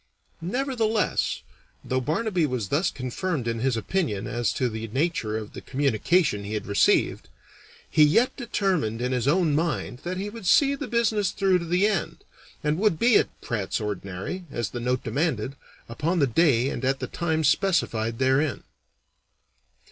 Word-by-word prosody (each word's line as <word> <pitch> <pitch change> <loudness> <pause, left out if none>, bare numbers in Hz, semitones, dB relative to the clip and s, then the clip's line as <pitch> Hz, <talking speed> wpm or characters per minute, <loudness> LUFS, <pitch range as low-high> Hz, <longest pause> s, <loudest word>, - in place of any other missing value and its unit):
Nevertheless, 225 - 0 0.4
though 130 0 0
Barnaby 170 - 0
was 125 -8 -3
thus 170 +6 +2
confirmed 130 +2 -3
in 115 -1 -1
his 125 0 +1
opinion 115 - -1
as 120 +1 -1
to 125 - 0
the 110 -1 -5
nature 120 -3 -1
of 110 -1 -7
the - - -8
communication 140 - +1
he 105 +2 -4
had 105 - -3
received, 100 -1 +2 0.6
he 155 - +4
yet 225 +12 +3
determined 185 - -1
in 125 +1 -1
his 125 0 0
own 165 0 +3
mind 150 -5 -1
that 180 +5 -4
he 200 +2 -4
would 220 -4 -7
see 280 +8 +5
the 280 - -5
business 220 -4 +1
through 190 -2 +2
to 170 - -5
the 180 +4 +2
end, 210 -5 -1 0.4
and 150 +2 0
would 205 -5 +2
be 235 +5 +4
at - - 0
Pratt's 105 -6 -2
Ordinary, 105 - -5
as 120 -5 -3
the 120 - -4
note 125 +1 -1
demanded, 135 -4 -1 0.3
upon 155 +10 -1
the 145 - +4
day 130 -1 +3
and - - -5
at 135 +1 +1
the - - -3
time 160 -2 -1
specified 125 - +1
therein. 135 +2 +1
150 Hz, 165 wpm, -25 LUFS, 120-185 Hz, 0.6 s, see